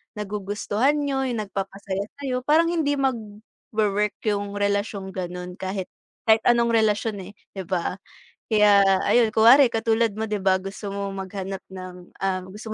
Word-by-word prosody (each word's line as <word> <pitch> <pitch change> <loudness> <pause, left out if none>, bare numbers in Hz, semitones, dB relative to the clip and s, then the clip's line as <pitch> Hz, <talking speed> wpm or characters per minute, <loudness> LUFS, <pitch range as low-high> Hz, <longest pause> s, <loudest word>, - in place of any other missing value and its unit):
nagugustuhan 210 +5 -1
niyo, 275 -2 -1
yung 230 -4 -2
nagpapasaya 195 0 -4 0.2
sayo 255 -2 -1
parang 315 +6 +3
hindi 300 -4 +1
mag-wowork 215 -4 -2
yung 205 -2 -1
relasyong 200 -1 -1
gano'n 180 0 -6
kahit, 190 0 -4 0.3
kahit 220 0 +5
anong 235 -1 +4
relasyon, 215 -1 +1
eh, 190 +1 -9 0.2
'di 190 -3 -7
ba? 185 +1 -2 0.5
Kaya 210 -2 +6 0.2
ayun 230 -3 +4
kunwari 235 +4 +6
katulad 225 0 +1
mo 220 - -1
'di 210 -2 -3
ba, 190 -1 +3
gusto 195 +1 -7
mo 200 0 -3
maghanap 195 0 -5
ng, 185 -1 -10
ah, 185 -1 -1
gusto 205 +4 -10
205 Hz, 145 wpm, -24 LUFS, 195-230 Hz, 0.5 s, Kaya